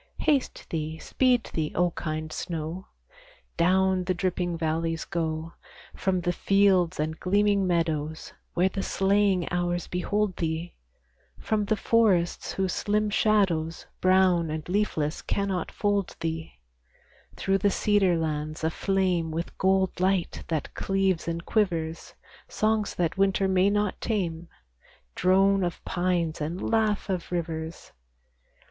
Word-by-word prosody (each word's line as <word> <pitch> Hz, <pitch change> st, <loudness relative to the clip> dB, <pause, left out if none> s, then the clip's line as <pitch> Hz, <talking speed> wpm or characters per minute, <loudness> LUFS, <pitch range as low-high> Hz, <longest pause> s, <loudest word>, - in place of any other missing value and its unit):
Haste 280 Hz, -4 st, 0 dB
thee, 160 Hz, -1 st, -3 dB
speed 250 Hz, +5 st, +1 dB
thee, 155 Hz, -2 st, -1 dB
O 175 Hz, 0 st, +2 dB
kind 155 Hz, -1 st, -4 dB
snow; 170 Hz, +2 st, -4 dB, 0.7 s
Down 185 Hz, +1 st, +2 dB
the 185 Hz, 0 st, 0 dB
dripping 180 Hz, -1 st, -1 dB
valleys 165 Hz, 0 st, -1 dB
go, 160 Hz, -1 st, -3 dB, 0.4 s
From 185 Hz, -1 st, 0 dB
the 175 Hz, +1 st, 0 dB
fields 190 Hz, -3 st, +3 dB
and 155 Hz, +1 st, -2 dB
gleaming 200 Hz, 0 st, +2 dB
meadows, 160 Hz, -3 st, -1 dB, 0.2 s
Where 180 Hz, +2 st, +4 dB
the 195 Hz, +1 st, -3 dB
slaying 195 Hz, -2 st, +2 dB
hours 175 Hz, -1 st, 0 dB
behold 200 Hz, +2 st, -1 dB
thee, 165 Hz, +1 st, -2 dB, 0.6 s
From 215 Hz, -1 st, -1 dB
the 215 Hz, -, +1 dB
forests 205 Hz, -6 st, +2 dB
whose 190 Hz, -1 st, -1 dB
slim 210 Hz, 0 st, 0 dB
shadows, 185 Hz, -7 st, +1 dB
Brown 185 Hz, -3 st, +3 dB
and 155 Hz, 0 st, -4 dB
leafless 175 Hz, -6 st, -1 dB
cannot 195 Hz, -3 st, -2 dB
fold 205 Hz, -2 st, -1 dB
thee, 160 Hz, 0 st, -4 dB, 0.8 s
Through 195 Hz, 0 st, +1 dB
the 200 Hz, -, +3 dB
cedar 195 Hz, -3 st, +2 dB
lands 155 Hz, -1 st, -3 dB
aflame 180 Hz, 0 st, 0 dB
With 165 Hz, +2 st, -4 dB
gold 190 Hz, -1 st, +2 dB
light 185 Hz, -1 st, 0 dB
that 155 Hz, -4 st, -3 dB
cleaves 195 Hz, -3 st, 0 dB
and 170 Hz, +1 st, -3 dB
quivers, 170 Hz, -7 st, -1 dB, 0.3 s
Songs 215 Hz, -1 st, 0 dB
that 175 Hz, +1 st, -1 dB
winter 195 Hz, 0 st, +3 dB
may 190 Hz, +1 st, +3 dB
not 205 Hz, -1 st, 0 dB
tame, 175 Hz, -6 st, -2 dB, 0.7 s
Drone 195 Hz, +1 st, +3 dB
of 175 Hz, -1 st, -4 dB
pines 175 Hz, -3 st, -1 dB
and 165 Hz, +5 st, -3 dB
laugh 215 Hz, -3 st, +1 dB
of 185 Hz, -3 st, -3 dB
rivers. 165 Hz, -1 st, -4 dB
180 Hz, 125 wpm, -27 LUFS, 165-195 Hz, 0.8 s, Where